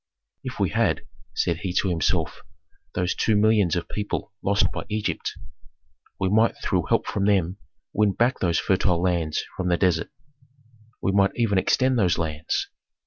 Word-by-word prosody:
"If -, -, -6 dB
we -, -, +1 dB
had," -, -, +1 dB, 0.3 s
said 85 Hz, -, +1 dB
he 95 Hz, -1 st, -4 dB
to 95 Hz, -, +1 dB
himself, 85 Hz, -3 st, 0 dB, 0.5 s
"those 90 Hz, 0 st, 0 dB
two 110 Hz, -, +1 dB
millions 105 Hz, -4 st, +3 dB
of 85 Hz, -, -2 dB
people 105 Hz, 0 st, -4 dB
lost 100 Hz, +1 st, +2 dB
by -, -, -4 dB
Egypt, 105 Hz, 0 st, -2 dB, 0.9 s
we 95 Hz, -, +1 dB
might 110 Hz, +4 st, +3 dB
through -, -, -1 dB
help -, -, +2 dB
from 100 Hz, -, -1 dB
them 95 Hz, -3 st, +2 dB, 0.4 s
win 105 Hz, -2 st, +2 dB
back 120 Hz, +5 st, +1 dB
those 85 Hz, -3 st, +1 dB
fertile 95 Hz, -2 st, +2 dB
lands 85 Hz, -4 st, 0 dB
from 95 Hz, -, -2 dB
the 85 Hz, -, +3 dB
desert, 85 Hz, -3 st, +1 dB, 0.9 s
we 95 Hz, -, +2 dB
might 100 Hz, 0 st, +3 dB
even 105 Hz, -5 st, +2 dB
extend 130 Hz, +5 st, +2 dB
those 90 Hz, -6 st, +2 dB
lands. 80 Hz, -1 st, -2 dB
95 Hz, 160 wpm, -24 LUFS, 85-105 Hz, 0.9 s, millions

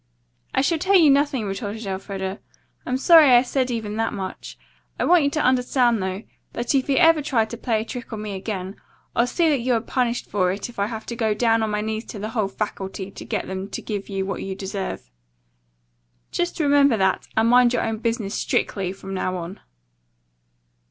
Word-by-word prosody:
"I -, -, +4 dB
shall 320 Hz, +4 st, +1 dB
tell 385 Hz, +4 st, +2 dB
you 320 Hz, -6 st, +7 dB
nothing," 275 Hz, -4 st, +2 dB
retorted 205 Hz, +2 st, -4 dB
Elfreda. 190 Hz, 0 st, -4 dB, 0.5 s
"I'm 255 Hz, -, 0 dB
sorry 315 Hz, +1 st, +7 dB
I 245 Hz, 0 st, +7 dB
said 260 Hz, 0 st, -1 dB
even 220 Hz, -3 st, -3 dB
that 225 Hz, 0 st, 0 dB
much. 190 Hz, -2 st, -6 dB, 0.4 s
I -, -, +1 dB
want 345 Hz, -4 st, +5 dB
you -, -, +3 dB
to 305 Hz, -, -2 dB
understand, 250 Hz, -3 st, +2 dB
though, 190 Hz, +2 st, -3 dB, 0.3 s
that 240 Hz, +3 st, -1 dB
if 270 Hz, 0 st, +1 dB
you 275 Hz, -, +2 dB
ever 330 Hz, -3 st, +5 dB
try 245 Hz, -6 st, +1 dB
to 230 Hz, -, -7 dB
play 225 Hz, -2 st, -1 dB
a -, -, -6 dB
trick 245 Hz, 0 st, -7 dB
on 220 Hz, -, -5 dB
me 210 Hz, -1 st, -5 dB
again, 190 Hz, -1 st, -5 dB, 0.4 s
I'll 235 Hz, -, +3 dB
see 335 Hz, +6 st, +1 dB
that 290 Hz, -3 st, +2 dB
you 245 Hz, +1 st, +1 dB
are -, -, +2 dB
punished 245 Hz, +1 st, -1 dB
for 185 Hz, -3 st, +1 dB
it 200 Hz, +5 st, -4 dB
if 240 Hz, -, -11 dB
I 200 Hz, -, +1 dB
have 220 Hz, -1 st, -6 dB
to 235 Hz, -, -5 dB
go 220 Hz, -2 st, 0 dB
down 225 Hz, 0 st, +2 dB
on 220 Hz, -, 0 dB
my 210 Hz, 0 st, -1 dB
knees 220 Hz, +1 st, -3 dB
to -, -, -8 dB
the 210 Hz, +2 st, -4 dB
whole 220 Hz, -3 st, 0 dB
faculty 195 Hz, -1 st, -5 dB
to -, -, -9 dB
get -, -, -3 dB
them 190 Hz, +1 st, -5 dB
to -, -, -5 dB
give 205 Hz, -2 st, -5 dB
you 195 Hz, -1 st, -2 dB
what 195 Hz, -, -4 dB
you 195 Hz, -1 st, -4 dB
deserve. 190 Hz, -, -5 dB, 1.2 s
Just 350 Hz, 0 st, -2 dB
remember 285 Hz, -5 st, +4 dB
that, 190 Hz, -1 st, +1 dB
and 220 Hz, +1 st, +4 dB
mind 245 Hz, 0 st, +6 dB
your 245 Hz, -, 0 dB
own 225 Hz, -1 st, -2 dB
business, 225 Hz, -3 st, -2 dB
strictly, 190 Hz, -3 st, -1 dB
from 195 Hz, 0 st, -8 dB
now 185 Hz, -1 st, -2 dB
on." 175 Hz, +3 st, -7 dB
225 Hz, 210 wpm, -23 LUFS, 195-255 Hz, 1.2 s, you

